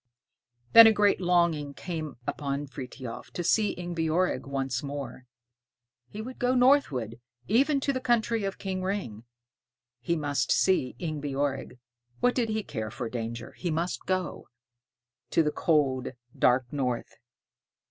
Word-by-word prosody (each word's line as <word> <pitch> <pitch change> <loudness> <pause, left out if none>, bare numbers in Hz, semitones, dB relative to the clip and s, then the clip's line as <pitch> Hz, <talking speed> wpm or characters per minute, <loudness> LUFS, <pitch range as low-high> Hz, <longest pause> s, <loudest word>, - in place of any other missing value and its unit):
Then 230 0 +11
a - - +7
great 205 -2 +3
longing 170 -5 +1
came 160 -6 -5
upon 140 0 -3
Frithiof 130 -2 -8
to 175 - -3
see 210 +4 +2
Ingebjorg 175 -1 -1
once 135 -3 -2
more. 140 -3 -6 0.8
He 215 +1 -6
would 255 +2 -9
go 250 +1 +2
northward, 165 - +3 0.3
even 275 - +3
to 275 - 0
the 260 - -2
country 230 -2 +1
of 195 0 -3
King 190 -1 -3
Ring; 185 - -3 0.7
he 170 +8 -1
must 145 -3 -1
see 185 -9 +2
Ingebjorg. 145 -5 -3 0.4
What 245 0 +3
did 235 -3 0
he 215 0 -1
care 110 - -5
for 120 +1 -5
danger? 115 0 -5
He 180 - -4
must 170 +3 -2
go. 185 -1 -2 0.8
To 165 - +3
the 150 - 0
cold, 135 -7 +1 0.2
dark 125 0 +2
north. 125 -4 -2
155 Hz, 135 wpm, -28 LUFS, 130-200 Hz, 0.8 s, Then